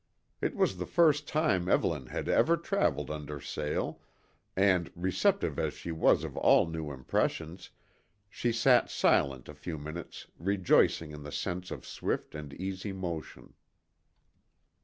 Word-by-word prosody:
It - - -1
was 95 - +1
the 90 - -4
first 150 -4 +3
time 100 - +1
Evelyn 75 -9 +1
had - - -4
ever 170 +1 +4
travelled 80 - 0
under 75 -1 -5
sail 75 +1 -3 0.5
and, 90 -3 +3
receptive 95 +1 +1
as - - -1
she 85 - -6
was 80 0 +3
of - - -6
all - - +5
new 80 -2 -4
impressions, 80 +6 -2 0.6
she 120 +4 -1
sat 120 +2 +4
silent 65 -2 +2
a 75 - -8
few 80 +2 -6
minutes 75 +3 -7
rejoicing 90 -3 +2
in 75 0 -9
the 75 0 -8
sense 90 +3 -3
of - - -7
swift - - -3
and 75 -2 -7
easy 95 +2 -4
motion. 85 -4 -6
85 Hz, 140 wpm, -30 LUFS, 75-95 Hz, 0.6 s, all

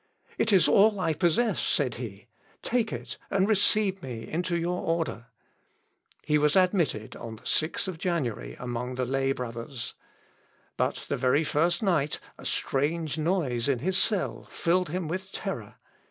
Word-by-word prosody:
"It 220 - +3
is 190 -4 +6
all 205 0 +5
I 165 -3 +1
possess," 175 +7 +2
said 130 -5 +1
he, 105 -4 -7 0.4
"take 230 -2 +1
it, - - -6
and 195 0 +2
receive 205 -2 +3
me 120 -5 -6
into 175 +2 -1
your 175 +1 -1
order." 165 -8 -1 1.0
He 150 0 +3
was 150 0 +3
admitted 180 - +2
on 115 -1 -7
the 110 - -17
6th 160 +2 0
January 120 - -2
among 125 +1 -3
the 130 0 0
lay 135 +1 +1
brothers. 120 0 -5 0.8
But - - -1
the - - -1
very 130 +5 +3
first 170 +5 +1
night 155 -7 +1 0.2
a - - -10
strange 155 +2 0
noise 150 -8 +1
in 135 - +3
his 180 +10 -1
cell 140 - 0
filled 180 +1 +1
him 175 0 -2
with 190 +4 -4
terror. - - -5
160 Hz, 155 wpm, -28 LUFS, 125-185 Hz, 1.0 s, is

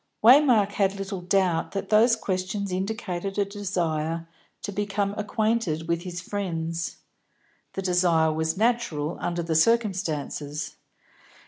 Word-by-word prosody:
Waymark 240 -5 +6
had 195 -1 +1
little 195 -1 -5
doubt 180 -2 +1
that 195 - -3
those 230 +2 +5
questions 190 +1 -2
indicated 195 -1 -3
a 200 - +2
desire 170 -5 -2 0.4
to 205 - -3
become 200 0 -1
acquainted 210 -6 0
with 170 0 0
his 175 -1 -6
friends; 170 -4 -3 0.8
the 195 - -4
desire 175 -3 +3
was 160 +2 -1
natural, 210 -9 0
under 175 0 -2
the 165 -1 -1
circumstances. 160 -7 0
190 Hz, 120 wpm, -26 LUFS, 165-205 Hz, 0.8 s, Waymark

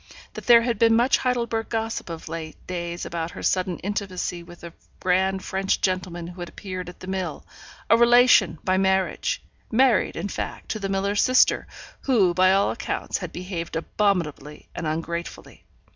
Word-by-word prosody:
That - - -9
there 235 -1 +8
had 235 -3 -1
been 225 0 +5
much 240 +4 +4
Heidelberg 235 -3 -1
gossip 225 -4 -3
of 165 -1 -7
late 160 -1 -6
days 175 -1 -4
about 165 -1 -3
her - - -9
sudden 185 -1 0
intimacy 190 -3 -3
with 175 0 -14
a 170 -1 -8 0.3
grand 190 +1 +1
French 195 0 0
gentleman 185 -2 -2
who 175 +1 -10
had 175 - -5
appeared 185 -3 -6
at 180 - -14
the - - -7
mill 190 -1 -4 0.4
a - - +6
relation, 235 -7 +5
by 185 0 +2
marriage 190 0 0 0.3
married, 250 0 +3
in - - -3
fact, - - -5
to 215 - -2
the 195 -1 -3
miller's 200 +1 +1
sister, 255 0 +4 0.4
who, 210 -10 +3
by 185 +1 +4
all 195 +1 +3
accounts, 220 - -3
had 180 -3 -6
behaved 180 -2 -5
abominably 165 -5 -1
and 165 - -4
ungratefully. 170 +2 -5
190 Hz, 170 wpm, -24 LUFS, 175-215 Hz, 0.4 s, there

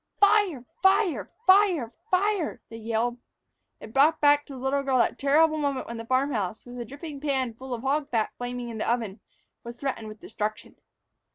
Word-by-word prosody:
"Fire! 405 - +3 0.2
Fire! 355 - +2
Fire! 370 - +4 0.2
Fire!" 380 -2 +1
they 225 - -8
yelled. 230 +2 -1 0.6
It 220 - -11
brought 300 +5 +4
back 290 0 +4
to 280 - -9
the - - -8
little 265 +2 0
girl 270 -2 +1
that 240 - +1
terrible 310 +3 +3
moment 280 -3 -1
when 235 - -6
the 230 0 -8
farm 260 +3 +2
house, 210 -1 -3
with 245 0 -9
a 240 - -4
dripping 285 +3 -8
pan 265 -5 0
full 260 +3 -10
of 240 -1 -4
hog 285 +2 0
fat 225 -3 0
flaming 245 0 -5
in 225 -2 -6
the 220 - 0
oven, 225 -4 -2 0.4
was 235 0 -8
threatened 255 -5 -3
with 215 0 -10
destruction. 215 0 -5
260 Hz, 190 wpm, -26 LUFS, 230-295 Hz, 0.6 s, Fire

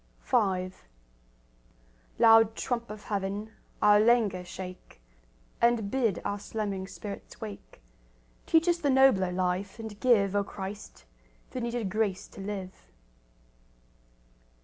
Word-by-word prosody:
V 190 -7 +1 1.5
Loud 225 -1 +6
trump 235 -1 -3
of 210 0 -8
Heaven, 205 +1 -3 0.3
our 210 0 +7
languor 215 -5 +3
shake, 180 - -9 0.6
And 235 -4 +2
bid 230 -9 +1
our 205 0 -2
slumbering 200 -2 -4
spirits 200 +2 -9
wake; 205 - -9 0.6
Teach 325 +1 +4
us 345 -1 +3
the 290 - 0
nobler 260 -9 +4
life, 185 +2 -1
and 220 -2 -8
give, 205 -6 +3
O 200 - +2
Christ, 195 +1 -8 0.5
the 255 - -4
needed 235 -4 -2
grace 205 -2 -1
to - - -11
live. 195 -2 -5
205 Hz, 115 wpm, -29 LUFS, 190-230 Hz, 1.5 s, our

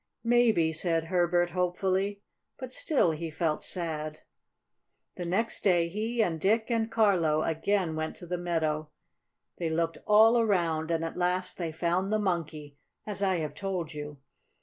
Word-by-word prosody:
"Maybe," 230 -9 +3
said 165 0 0
Herbert 175 0 +1
hopefully. 190 +3 -1 0.3
But 255 -1 -7
still 265 - +2
he 160 +1 -4
felt 155 -1 -1
sad. 155 -3 -3 0.9
The 175 - -5
next 210 +7 -1
day 175 -4 +3
he 220 +5 0
and 165 -6 -2
Dick 220 +4 +2
and 225 -1 +1
Carlo 180 -9 +2
again 165 +1 0
went 155 0 -3
to - - -10
the 175 0 -3
meadow. 155 -3 -1 0.7
They 170 -2 -1
looked 165 +1 -1
all 220 +3 +6
around, 170 -7 +1
and 165 -1 0
at 165 - -6
last 180 +1 -1
they 170 -2 -2
found 175 +4 -1
the 215 - +3
Monkey, 155 -7 -3 0.3
as 205 -1 -5
I 190 -2 +2
have 155 -4 -3
told 180 -2 -4
you. 150 -1 -7
175 Hz, 155 wpm, -29 LUFS, 160-200 Hz, 0.9 s, all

